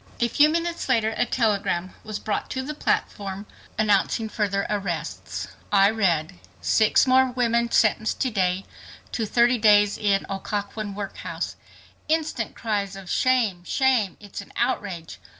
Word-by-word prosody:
A 235 - +3
few 295 +6 +4
minutes 335 -1 -2
later 225 -3 +2
a 245 - +1
telegram 200 -6 0
was 215 -1 -4
brought 210 - -3
to 260 - -3
the 300 +3 -4
platform 200 -8 -2 0.3
announcing 215 +1 +2
further 200 -2 -1
arrests. 195 -6 -4 0.2
I 200 0 +5
read: 170 - 0 0.2
"Six 220 -1 +3
more 260 0 +4
women 235 -1 +1
sentenced 220 -1 +2
to 255 - +1
day 190 -2 0 0.5
to 225 -2 -2
30 240 +2 +3
days 205 -1 +5
in 200 -2 +1
Occoquan 200 +1 -4
workhouse." 200 -1 -5 0.5
Instant 310 -8 -1
cries 205 -3 -2
of 195 -2 -8
"Shame! 235 -9 +2
Shame! 245 -4 +1
It's 205 -1 -8
an 200 - -14
outrage!" 175 -5 -2
210 Hz, 140 wpm, -24 LUFS, 195-235 Hz, 0.5 s, I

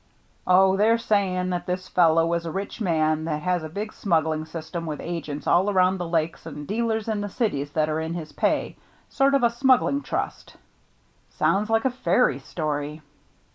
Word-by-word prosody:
"Oh, 190 +1 +5
they're 220 +3 +4
saying 190 -5 0
that 175 -1 -3
this 185 +1 -3
fellow 165 -1 +3
is 170 0 -2
a - - -3
rich 200 +6 -5
man 155 -4 +1
that 150 -2 -3
has 180 -1 +1
a 155 - -6
big 210 +6 -5
smuggling 160 -4 0
system 165 +1 -6
with 150 -2 -4
agents 155 -4 -5
all 185 +4 +3
around 185 -1 +2
the 175 - -3
Lakes 165 0 -1
and 150 -1 -7
dealers 220 +1 -1
in 215 -2 -1
the 205 - -4
cities 165 - -1
that 155 -1 +1
are 155 0 -1
in 160 +1 -3
his 160 -3 -6
pay, - - -1 0.2
— - - -34
sort 275 0 +2
of 275 - +2
a 235 - +4
smuggling 265 +3 +3
trust." - - -4 0.7
"Sounds 210 +2 0
like 225 +1 +2
a 265 - +3
fairy 175 - +1
story." 150 +1 -4
175 Hz, 190 wpm, -24 LUFS, 160-205 Hz, 0.7 s, Oh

